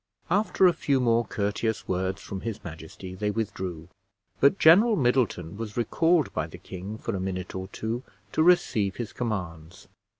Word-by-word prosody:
After 200 0 +3
a 180 - +6
few 140 -4 +1
more 115 -1 +3
courteous 105 +2 -2
words 95 +1 -2
from 95 -1 -6
his 115 -3 -5
majesty, 80 +3 -9
they 105 +3 -2
withdrew, 95 -6 -4 0.5
but 140 +8 +5
General 205 +8 +6
Middleton 120 - +1
was 115 0 -6
recalled 165 +6 +2
by - - -1
the - - -11
king 95 +4 -7
for 115 -1 -3
a - - -2
minute 95 -1 -4
or 95 0 -5
two 110 +4 -4 0.3
to - - +1
receive 115 - +3
his 120 -3 -5
commands. 90 -8 -5
105 Hz, 165 wpm, -27 LUFS, 95-125 Hz, 0.5 s, a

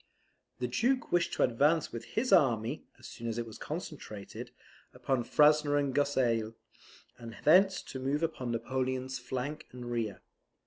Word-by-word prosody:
The 125 - -2
Duke 245 - 0
wished 175 -1 +2
to - - +2
advance 145 +6 +2
with 115 -1 -6
his 250 +3 0
army 120 0 +3
(as - - -15
soon 115 - -7
as 115 0 -2
it 120 - -2
was 110 - -11
concentrated) 145 - -7 0.5
upon 130 -3 0
Frasne 150 +2 +4
and 140 -2 0
Gosselies, 120 -6 +1 0.7
and 115 -1 -9
thence 185 +5 +5
to 130 - -7
move 140 +4 -1
upon 145 -7 -2
Napoleon's 130 +2 -2
flank 130 +4 -4
and 125 -1 -7
rear. 110 -5 -2
130 Hz, 150 wpm, -31 LUFS, 120-150 Hz, 0.7 s, thence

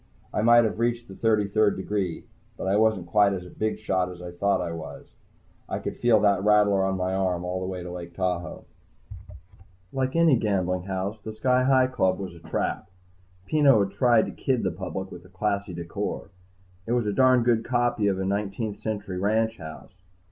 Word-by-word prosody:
I - - 0
might 120 +1 +6
have 110 0 -2
reached 120 0 -1
the 95 - -10
thirty 105 0 +1
third 105 +1 +2
degree, 95 -3 -3 0.3
but - - -5
I 95 - +2
wasn't 110 -4 +2
quite 100 +2 +3
as 90 -2 -5
big 110 +4 -2
a - - -14
shot 95 -3 -1
as 90 -1 -10
I 90 0 -7
thought 100 +3 +1
I 85 -2 -3
was. 80 -4 -8 0.6
I - - -2
could - - -5
feel 120 -3 +4
that 100 -2 +3
rattler 105 -2 +4
on 95 0 0
my 90 0 -1
arm 90 -2 -1
all 90 +1 -2
the 95 - -4
way 90 -1 -5
to 90 - -7
Lake 85 -1 -8
Tahoe. 90 -1 -3 1.3
Like 130 +1 -1
any 165 -5 +5
gambling 90 -4 -1
house, 95 +2 -3
the 110 - -6
Sky 125 +4 +1
Hi 130 -1 +5
Club 95 -8 +1
was 95 -3 -6
a 85 - -13
trap. 85 - -3 0.6
Peno 140 -2 +4
had 100 - -4
tried 115 +2 +3
to - - -6
kid 130 -5 -1
the 95 - 0
public 95 +2 -6
with 90 - -10
a 90 - -17
classy 100 +1 -2
decor. 85 +3 -5 0.6
It 115 - 0
was 120 -2 +1
a 105 - -1
darned 130 0 +4
good 115 -2 +2
copy 120 -3 +1
of 95 -2 +1
a 95 - -2
nineteenth 100 +2 -2
century 100 -4 -4
ranch 110 +3 +1
house. 80 +3 -10
100 Hz, 205 wpm, -26 LUFS, 95-110 Hz, 1.3 s, might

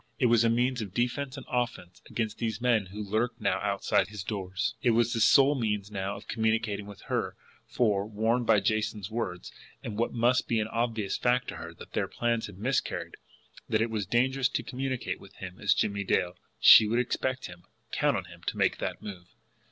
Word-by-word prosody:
It - - +2
was 120 -1 +5
a 115 - +4
means 125 +1 +1
of 100 -3 -7
defense 130 +3 -1
and 135 - -8
offense 120 -8 -3
against 110 -2 -3
these 110 -2 -2
men 120 -5 +2
who 105 +3 -6
lurked 115 +4 -1
now - - +1
outside 100 -2 +1
his 105 -2 -7
doors. 95 +1 -2
It 115 -2 +3
was 120 0 +2
the 115 - -1
sole 135 +5 +6
means 105 -6 -2
now 100 0 -3
of - - -11
communication 110 -2 0
with 100 -1 -11
her; - - -2 0.3
for, 105 -4 +1
warned 110 +3 0
both 110 - +6
by - - +4
Jason's 105 -1 -1
words, 95 -6 -4 0.3
and 110 -1 -5
what 115 - +1
must 120 +2 +2
be 115 - +1
an 105 - -1
obvious 115 -3 -1
fact 125 0 +1
to - - -6
her, 85 - -7
that - - -13
their - - 0
plans 115 -1 -1
had 100 -3 -12
miscarried, 125 +6 -1 0.6
that 110 - +2
it 115 +1 0
was 105 -4 -2
dangerous 130 +4 +2
to - - -2
communicate 130 +2 -3
with 100 - -15
him 95 -1 -9
as 105 - +2
Jimmie 100 -1 0
Dale, 90 -1 0 0.2
she 110 - +9
would 115 +3 +1
expect 130 +1 -1
him, 90 0 -11 0.3
count - - +2
on - - -4
him - - -14
to - - -1
make - - +2
that - - -4
move. 90 -4 -8
110 Hz, 210 wpm, -29 LUFS, 100-120 Hz, 0.6 s, she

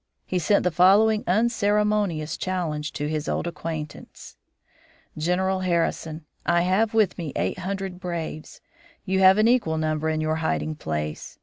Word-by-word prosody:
He 185 - -1
sent 200 +5 +2
the 180 - +1
following 205 +6 +4
unceremonious 210 -5 +1
challenge 160 -5 -3
to 145 -1 -3
his 155 0 -3
old - - -1
acquaintance: 160 -3 -7 0.8
"General 185 +4 0
Harrison: 165 -3 -1 0.2
I 175 0 +2
have 205 +5 +1
with 210 -5 +2
me 160 -5 -5
eight 90 - -1
hundred 190 0 -4
braves. 165 -3 -6 0.4
You 190 -1 0
have 190 +1 +7
an 215 +1 +4
equal 230 -10 +2
number 155 0 -1
in 155 0 -1
your 155 0 0
hiding 160 -1 -1
place. 75 - -5
175 Hz, 145 wpm, -24 LUFS, 155-195 Hz, 0.8 s, have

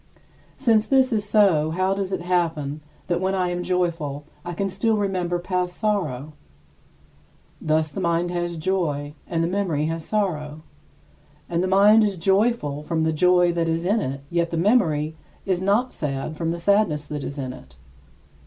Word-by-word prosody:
Since 225 -5 +3
this 265 -2 +3
is 210 -2 -1
so, 185 -8 +4
how 185 +4 +1
does 195 -1 -3
it 190 - -2
happen 160 -5 -1 0.2
that 175 0 -1
when 190 +1 0
I 180 -2 0
am 175 0 -2
joyful 170 -5 -1 0.2
I 175 - -5
can 195 +3 -1
still 215 +4 0
remember 185 -3 -1
past 180 0 -2
sorrow? 155 - -1 1.3
Thus 155 0 +1
the 195 - -5
mind 170 0 0
has 175 -1 -2
joy, 155 -4 -1
and 165 -1 -1
the - - +1
memory 175 -6 0
has 165 0 -3
sorrow; 155 -8 -2 0.8
and 170 0 -1
the 185 - 0
mind 205 +3 +6
is 200 -3 0
joyful 190 -5 +1
from 160 +1 -1
the 160 0 +1
joy 180 +2 +4
that 165 -1 0
is 165 +1 -1
in 210 +5 +2
it, 135 -7 -4
yet 170 -1 +1
the 165 - -3
memory 160 -6 +2 0.3
is 185 -3 0
not 210 +7 +1
sad 140 +1 -3
from 165 +1 -2
the 170 - -2
sadness 170 -5 +2
that 150 -1 -5
is 140 - -6
in 130 -2 -4
it. 65 - -14
175 Hz, 175 wpm, -23 LUFS, 155-195 Hz, 1.3 s, mind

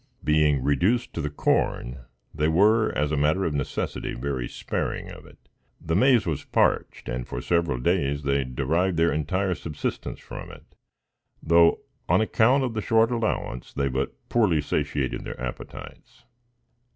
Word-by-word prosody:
Being 75 -3 +3
reduced 90 - +1
to 80 - -3
the 75 - -2
corn, 65 -3 -1 0.3
they 75 0 0
were, 105 +7 +4
as 75 0 0
a - - +1
matter 75 +6 +2
of 80 - -1
necessity, 70 -2 -3
very 65 -1 -3
sparing - - -4
of - - -12
it. - - -17 0.4
The 80 0 -2
maize 125 +2 +4
was 80 -5 -2
parched, - - 0
and 65 -1 -4
for - - -4
several 85 0 0
days 70 0 0
they 70 0 +1
derived 80 +8 0
their 85 +1 +3
entire 95 +5 0
subsistence 80 -3 -5
from - - -9
it; - - -12 0.8
though, 85 +1 +4 0.3
on - - +4
account 115 +5 +3
of 125 -3 -2
the 110 - -2
short 115 +2 +3
allowance, 110 - -2
they 70 -1 0
but 65 +1 -2
poorly 105 -10 +2
satiated 70 -2 -2
their - - -7
appetites. - - -8
80 Hz, 155 wpm, -25 LUFS, 70-95 Hz, 0.8 s, were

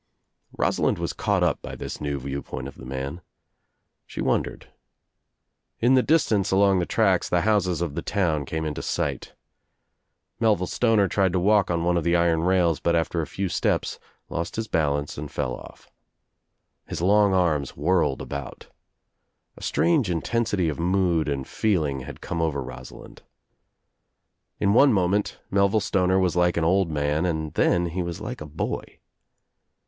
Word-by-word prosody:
Rosalind - - +1
was - - -3
caught - - 0
up - - +1
by - - -7
this - - -7
new 70 -1 -2
view 70 +1 -4
point 65 0 -6
of 70 - -9
the 65 - -10
man. 70 +5 -5 0.9
She - - -9
wondered. - - -1 1.1
In 120 +3 +4
the 130 - +6
distance 110 - +2
along 95 0 +4
the 85 - -1
tracks - - +2
the - - +2
houses 100 -5 +1
of 85 -5 -2
the - - -3
town 80 -8 0
came 80 +3 -3
into 75 -1 -3
sight. - - -3 1.0
Mel 110 -2 +4
ville 90 - -3
Stoner 110 0 +2
tried 95 0 +1
to 90 - +2
walk 100 +1 +3
on 85 -1 0
one 90 0 +2
of 85 - 0
the 85 +1 +2
iron 85 -1 +2
rails 90 -2 +2
but 85 - +1
after 85 0 0
a 80 - -4
few 100 0 -3
steps - - -1 0.3
lost 85 +1 -4
his 110 0 -3
balance 75 -4 -1
and 75 0 -6
fell 65 -1 -2
off. - - -11 1.0
His - - -5
long 100 0 +4
arms 80 -7 0
whirled 85 -2 +1
about. 70 -3 -7 0.9
A - - -15
strange 85 - +1
intensity 100 +1 0
of 75 -1 -3
mood 85 -3 +1
and 70 -2 -3
feeling 80 -11 0
had 65 - -9
come 85 - -3
over 75 -4 -1
Rosalind. - - -11 1.4
In 100 -1 +2
one 135 +4 +6
moment 100 +1 0
Melville 100 +2 +3
Stoner 95 -2 +1
was 90 -3 +1
like 90 0 +2
an 85 - +1
old 95 +1 +2
man 75 +1 0
and 80 -3 -2
then 85 0 +2
he 90 +3 -3
was 85 +1 -4
like 120 +3 -6
a 75 - -6
boy. 75 - -4
85 Hz, 170 wpm, -25 LUFS, 75-100 Hz, 1.4 s, the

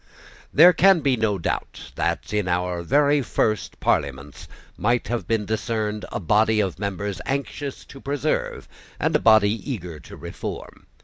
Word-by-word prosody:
There 175 +5 +8
can 190 -2 +5
be 135 -3 +2
no 110 -3 0
doubt 85 - -4
that 85 +5 -2
in 105 -3 0
our 90 0 -1
very 145 - +3
first 110 -6 -1
Parliaments 70 +2 -2 0.3
might 120 +2 0
have 120 0 -2
been 110 -2 0
discerned 110 -1 -2
a - - -3
body 110 +4 +2
of 95 -4 -1
members 100 -1 -3
anxious 140 0 -4
to 135 - -13
preserve, 145 +2 -2 0.3
and - - +1
a - - +4
body 110 -2 +5 0.2
eager 90 - -6
to - - -12
reform. - - -8
110 Hz, 150 wpm, -23 LUFS, 95-135 Hz, 0.3 s, There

